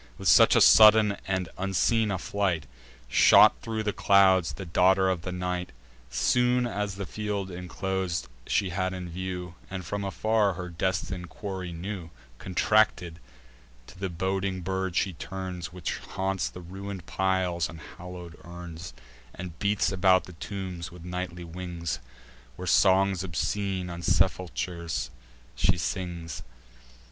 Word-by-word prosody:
With -, -, -4 dB
such -, -, +7 dB
a -, -, +5 dB
sudden 105 Hz, -1 st, +7 dB
and 95 Hz, -2 st, -1 dB
unseen 105 Hz, +4 st, +2 dB
a 95 Hz, -, 0 dB
flight 95 Hz, -4 st, -1 dB, 0.4 s
Shot 60 Hz, -, +6 dB
thro' 110 Hz, -1 st, -3 dB
the 105 Hz, -1 st, -1 dB
clouds 95 Hz, -3 st, +4 dB
the 95 Hz, -, -7 dB
daughter 95 Hz, +3 st, +3 dB
of 95 Hz, -3 st, 0 dB
the 90 Hz, -, -5 dB
night. 90 Hz, 0 st, -3 dB, 0.4 s
Soon 125 Hz, 0 st, +2 dB
as 105 Hz, -4 st, -3 dB
the 100 Hz, 0 st, -4 dB
field 100 Hz, +1 st, -3 dB
inclos'd 90 Hz, -1 st, -3 dB, 0.2 s
she 95 Hz, -, +1 dB
had 95 Hz, +1 st, -1 dB
in 90 Hz, -1 st, -6 dB
view, 90 Hz, 0 st, -5 dB, 0.2 s
And 95 Hz, -2 st, -5 dB
from 100 Hz, 0 st, -3 dB
afar 105 Hz, +1 st, +1 dB
her 90 Hz, 0 st, -6 dB
destin'd 90 Hz, +1 st, -2 dB
quarry 95 Hz, -3 st, -5 dB
knew, 90 Hz, 0 st, -6 dB, 0.3 s
Contracted, 90 Hz, -3 st, +1 dB, 0.7 s
to -, -, -15 dB
the 95 Hz, -1 st, -2 dB
boding 95 Hz, +2 st, -2 dB
bird 95 Hz, 0 st, -2 dB
she 95 Hz, 0 st, +1 dB
turns, 90 Hz, 0 st, -6 dB
Which 90 Hz, -2 st, -4 dB
haunts 95 Hz, -1 st, -2 dB
the 90 Hz, -, -10 dB
ruin'd 95 Hz, +1 st, -7 dB
piles 95 Hz, -3 st, 0 dB
and 85 Hz, -, -10 dB
hallow'd 90 Hz, +1 st, -10 dB
urns, 85 Hz, 0 st, -9 dB, 0.4 s
And 85 Hz, -2 st, -8 dB
beats 100 Hz, 0 st, +1 dB
about 95 Hz, 0 st, +4 dB
the 90 Hz, -, -12 dB
tombs 95 Hz, 0 st, -6 dB
with 90 Hz, -1 st, -12 dB
nightly 90 Hz, -1 st, -5 dB
wings, 85 Hz, -1 st, -5 dB, 0.6 s
Where 90 Hz, -, -7 dB
songs 95 Hz, +1 st, +4 dB
obscene 95 Hz, +1 st, -2 dB
on 85 Hz, 0 st, -6 dB
sepulchers 85 Hz, -7 st, 0 dB, 0.4 s
she -, -, +2 dB
sings. 85 Hz, -1 st, -4 dB
95 Hz, 140 wpm, -27 LUFS, 90-95 Hz, 0.7 s, such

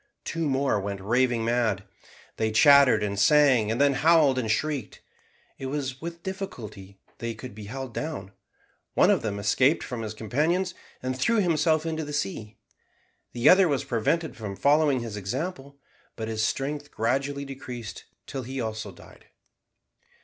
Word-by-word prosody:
Two 165 Hz, -2 st, -2 dB
more 135 Hz, -5 st, +1 dB
went 100 Hz, 0 st, -4 dB
raving 120 Hz, +3 st, +1 dB
mad. 115 Hz, -4 st, +1 dB, 0.5 s
They 110 Hz, 0 st, 0 dB
chattered 140 Hz, -2 st, +6 dB
and 100 Hz, -1 st, -2 dB
sang, 130 Hz, -2 st, +5 dB
and 115 Hz, -, -1 dB
then 140 Hz, 0 st, +4 dB
howled 150 Hz, -2 st, +4 dB
and 115 Hz, -3 st, -2 dB
shrieked. 140 Hz, 0 st, -2 dB, 0.6 s
It 135 Hz, -, -4 dB
was 135 Hz, -1 st, -4 dB
with 170 Hz, +1 st, -7 dB
difficulty 110 Hz, -, -7 dB, 0.2 s
they 115 Hz, -1 st, -4 dB
could 125 Hz, +3 st, -9 dB
be 105 Hz, 0 st, -9 dB
held 130 Hz, +3 st, -6 dB
down. 145 Hz, -11 st, -5 dB, 0.6 s
One -, -, +5 dB
of -, -, +2 dB
them 105 Hz, -2 st, -3 dB
escaped 130 Hz, +9 st, +2 dB
from 125 Hz, -2 st, -5 dB
his 110 Hz, -1 st, -5 dB
companions, 155 Hz, -, 0 dB, 0.3 s
and 130 Hz, 0 st, -2 dB
threw 180 Hz, -, +1 dB
himself 160 Hz, -4 st, +2 dB
into 160 Hz, -1 st, -2 dB
the 150 Hz, 0 st, -6 dB
sea. 105 Hz, -5 st, -4 dB, 0.8 s
The 120 Hz, +3 st, +1 dB
other 190 Hz, 0 st, +7 dB
was 140 Hz, -3 st, 0 dB
prevented 140 Hz, +6 st, -1 dB
from 105 Hz, -4 st, -6 dB
following 145 Hz, +1 st, +3 dB
his 115 Hz, -3 st, -6 dB
example, 140 Hz, -, -5 dB, 0.4 s
but 110 Hz, -1 st, -5 dB
his 110 Hz, -1 st, -1 dB
strength 145 Hz, +6 st, -2 dB
gradually 135 Hz, +5 st, -1 dB
decreased 125 Hz, -5 st, -8 dB, 0.2 s
till 135 Hz, -, -5 dB
he 130 Hz, +2 st, -6 dB
also 110 Hz, -3 st, -4 dB
died. 85 Hz, -, -17 dB
130 Hz, 155 wpm, -26 LUFS, 110-150 Hz, 0.8 s, other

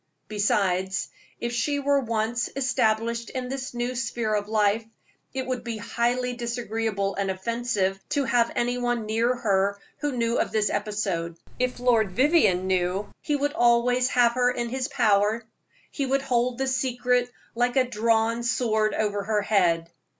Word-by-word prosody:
Besides, 190 Hz, -3 st, 0 dB, 0.3 s
if 235 Hz, 0 st, -3 dB
she 285 Hz, +5 st, 0 dB
were 280 Hz, 0 st, +2 dB
once 230 Hz, -1 st, -1 dB
established 235 Hz, -3 st, 0 dB
in 255 Hz, -1 st, -4 dB
this 265 Hz, -1 st, -5 dB
new 240 Hz, +1 st, -1 dB
sphere 235 Hz, -3 st, -2 dB
of 205 Hz, 0 st, -1 dB
life, 215 Hz, 0 st, +2 dB, 0.5 s
it 260 Hz, -1 st, -3 dB
would 255 Hz, -1 st, -3 dB
be 235 Hz, -2 st, -4 dB
highly 240 Hz, +3 st, -1 dB
disagreeable 225 Hz, -4 st, -2 dB
and 195 Hz, 0 st, -2 dB
offensive 195 Hz, -1 st, -1 dB
to 285 Hz, -1 st, +1 dB
have 235 Hz, -2 st, +2 dB
any 245 Hz, +1 st, 0 dB
one 240 Hz, -2 st, -1 dB
near 230 Hz, +3 st, +1 dB
her 200 Hz, -4 st, +1 dB, 0.2 s
who 295 Hz, -2 st, -1 dB
knew 235 Hz, 0 st, +1 dB
of -, -, 0 dB
this 210 Hz, -2 st, +1 dB
episode. 200 Hz, -5 st, -2 dB, 0.2 s
If 250 Hz, 0 st, -1 dB
Lord 230 Hz, -6 st, +2 dB
Vivianne 260 Hz, -, +3 dB
know, 190 Hz, +2 st, 0 dB
he 295 Hz, -, 0 dB
would 290 Hz, +1 st, 0 dB
always 245 Hz, -2 st, +3 dB
have 245 Hz, -3 st, +4 dB
her 245 Hz, +1 st, +2 dB
in 240 Hz, -1 st, -2 dB
his 260 Hz, +1 st, -2 dB
power; 220 Hz, -4 st, +2 dB, 0.5 s
he 280 Hz, -2 st, -2 dB
would 270 Hz, +1 st, +1 dB
hold 250 Hz, -2 st, 0 dB
the 270 Hz, -, 0 dB
secret 250 Hz, -1 st, +1 dB, 0.2 s
like 245 Hz, +1 st, 0 dB
a 260 Hz, -2 st, +3 dB
drawn 230 Hz, 0 st, +1 dB
sword 220 Hz, -3 st, +1 dB
over 205 Hz, -1 st, 0 dB
her 210 Hz, -1 st, +1 dB
head. 170 Hz, -5 st, +2 dB
235 Hz, 160 wpm, -25 LUFS, 210-250 Hz, 0.5 s, have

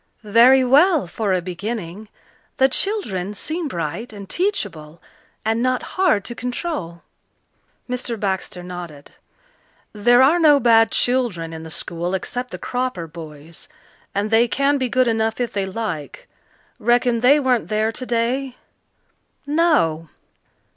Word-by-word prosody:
"Very 255 Hz, +3 st, +7 dB
well 295 Hz, -, +4 dB
for 200 Hz, +4 st, -2 dB
a 185 Hz, -2 st, +1 dB
beginning. 200 Hz, +2 st, -6 dB, 0.5 s
The 265 Hz, -, +5 dB
children 220 Hz, -, -1 dB
seem 315 Hz, -, -3 dB
bright 170 Hz, -, -4 dB
and 200 Hz, -2 st, -10 dB
teachable 170 Hz, -, -3 dB, 0.5 s
and 225 Hz, +1 st, +1 dB
not 255 Hz, 0 st, 0 dB
hard 220 Hz, -, +2 dB
to 240 Hz, -, -5 dB
control." 245 Hz, -, -5 dB, 0.8 s
Mr. 245 Hz, -2 st, -3 dB
Baxter 190 Hz, -2 st, -3 dB
nodded. 175 Hz, -5 st, -9 dB, 0.8 s
"There 240 Hz, +4 st, +4 dB
are 315 Hz, +6 st, +4 dB
no 300 Hz, -3 st, +6 dB
bad 225 Hz, -2 st, +5 dB
children 230 Hz, -11 st, 0 dB
in 160 Hz, -, -7 dB
the 160 Hz, -, -9 dB
school 170 Hz, +2 st, -3 dB
except 245 Hz, +6 st, -4 dB
the -, -, -7 dB
Cropper 250 Hz, -9 st, -3 dB
boys 160 Hz, -, -11 dB, 0.5 s
and 205 Hz, +2 st, -1 dB
they 230 Hz, +2 st, +4 dB
can 280 Hz, +3 st, +1 dB
be 255 Hz, -1 st, -1 dB
good 255 Hz, +1 st, +2 dB
enough 225 Hz, 0 st, 0 dB
if 245 Hz, -2 st, -2 dB
they 195 Hz, -1 st, -1 dB
like. 185 Hz, -, -5 dB, 0.5 s
Reckon 240 Hz, +1 st, +2 dB
they 265 Hz, +5 st, +5 dB
weren't 255 Hz, -4 st, +1 dB
there 215 Hz, +1 st, 0 dB
today?" 250 Hz, +2 st, -2 dB, 0.9 s
"No." 285 Hz, -, +1 dB
225 Hz, 135 wpm, -21 LUFS, 180-255 Hz, 0.9 s, Very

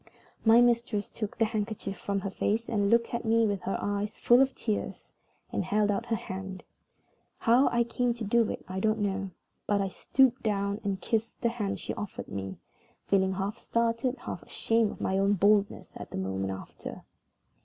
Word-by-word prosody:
My 225 Hz, +1 st, +7 dB
mistress 235 Hz, -4 st, +1 dB
took 215 Hz, -3 st, -5 dB
the 225 Hz, -, +4 dB
handkerchief 210 Hz, -2 st, -3 dB
from 200 Hz, 0 st, -2 dB
her 195 Hz, -, -3 dB
face, 220 Hz, +4 st, 0 dB
looked 230 Hz, +2 st, +2 dB
at 235 Hz, -, -1 dB
me 225 Hz, 0 st, +3 dB
with 200 Hz, -3 st, -1 dB
her 195 Hz, -, -2 dB
eyes 205 Hz, +1 st, -2 dB
full 240 Hz, +2 st, +5 dB
of 270 Hz, 0 st, +2 dB
tears, 215 Hz, -3 st, -3 dB, 0.4 s
and -, -, -1 dB
held 210 Hz, 0 st, +2 dB
out 220 Hz, +4 st, -2 dB
her 230 Hz, -, +1 dB
hand. 190 Hz, -2 st, -6 dB, 0.7 s
How 245 Hz, +4 st, +4 dB
I 235 Hz, 0 st, +2 dB
came 235 Hz, +1 st, 0 dB
to 235 Hz, -, -6 dB
do 225 Hz, +2 st, +3 dB
it -, -, -5 dB
I 185 Hz, 0 st, -3 dB
don't 215 Hz, +2 st, +2 dB
know, 195 Hz, -2 st, -1 dB, 0.4 s
but 205 Hz, -1 st, +2 dB
I 195 Hz, -1 st, 0 dB
stooped 260 Hz, +6 st, +2 dB
down 200 Hz, -1 st, -1 dB
and 195 Hz, -2 st, -1 dB
kissed 225 Hz, +4 st, -2 dB
the 235 Hz, -, +2 dB
hand 210 Hz, -4 st, -3 dB
she -, -, -4 dB
offered 205 Hz, -, -6 dB
me, 95 Hz, -1 st, -5 dB, 0.5 s
feeling 190 Hz, -1 st, +2 dB
half 200 Hz, +4 st, -3 dB
startled, 235 Hz, +3 st, 0 dB
half -, -, -6 dB
ashamed 225 Hz, -2 st, 0 dB
at -, -, -12 dB
my 190 Hz, 0 st, +1 dB
own 200 Hz, +1 st, +3 dB
boldness 205 Hz, +1 st, +2 dB, 0.2 s
the -, -, -5 dB
moment 95 Hz, 0 st, -2 dB
after. 95 Hz, -, -8 dB
210 Hz, 185 wpm, -29 LUFS, 195-230 Hz, 0.7 s, My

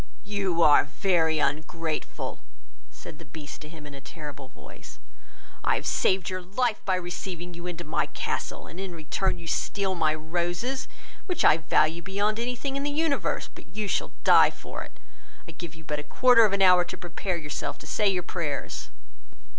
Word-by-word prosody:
"You 195 Hz, -5 st, +1 dB
are 145 Hz, -1 st, +7 dB
very 160 Hz, 0 st, +2 dB
ungrateful, 155 Hz, +2 st, -2 dB, 0.5 s
(said 150 Hz, -, -11 dB
the -, -, -9 dB
beast 145 Hz, +1 st, -9 dB
to 150 Hz, -, -9 dB
him, 155 Hz, -2 st, -11 dB
in 145 Hz, -, -9 dB
a 140 Hz, -, -9 dB
terrible 145 Hz, -2 st, -8 dB
voice) -, -, -13 dB, 0.7 s
I -, -, +3 dB
have -, -, -3 dB
saved 190 Hz, -2 st, +2 dB
your 185 Hz, 0 st, -2 dB
life 215 Hz, +5 st, 0 dB
by 190 Hz, -, +3 dB
receiving 175 Hz, -1 st, -5 dB
you 175 Hz, +1 st, -7 dB
into 175 Hz, -1 st, -5 dB
my 155 Hz, -, 0 dB
castle, -, -, -3 dB
and, 170 Hz, -, -10 dB
in 190 Hz, -3 st, -5 dB
return, 165 Hz, +4 st, -1 dB
you 170 Hz, -, -10 dB
steal 195 Hz, +3 st, 0 dB
my 155 Hz, -3 st, +2 dB
roses, 175 Hz, +11 st, -2 dB, 0.4 s
which 360 Hz, -, +1 dB
I -, -, +7 dB
value 160 Hz, +1 st, +2 dB
beyond 205 Hz, +4 st, 0 dB
any 245 Hz, +1 st, -1 dB
thing 270 Hz, +3 st, -3 dB
in 275 Hz, -, -1 dB
the 290 Hz, -, 0 dB
universe; 295 Hz, 0 st, 0 dB
but -, -, -15 dB
you 210 Hz, -1 st, -1 dB
shall -, -, -1 dB
die -, -, +8 dB
for -, -, -8 dB
it; -, -, -10 dB, 0.5 s
I -, -, -7 dB
give 170 Hz, -1 st, -8 dB
you 160 Hz, -, -13 dB
but 150 Hz, 0 st, -3 dB
a -, -, -5 dB
quarter 230 Hz, -, +6 dB
of 200 Hz, -, +1 dB
an 195 Hz, -1 st, +3 dB
hour 180 Hz, -1 st, +7 dB
to 175 Hz, -, -7 dB
prepare 175 Hz, +1 st, -3 dB
yourself, 150 Hz, -2 st, -4 dB
to -, -, -12 dB
say 205 Hz, +6 st, +2 dB
your 180 Hz, -2 st, 0 dB
prayers." 160 Hz, -6 st, -3 dB
175 Hz, 190 wpm, -27 LUFS, 155-195 Hz, 0.7 s, die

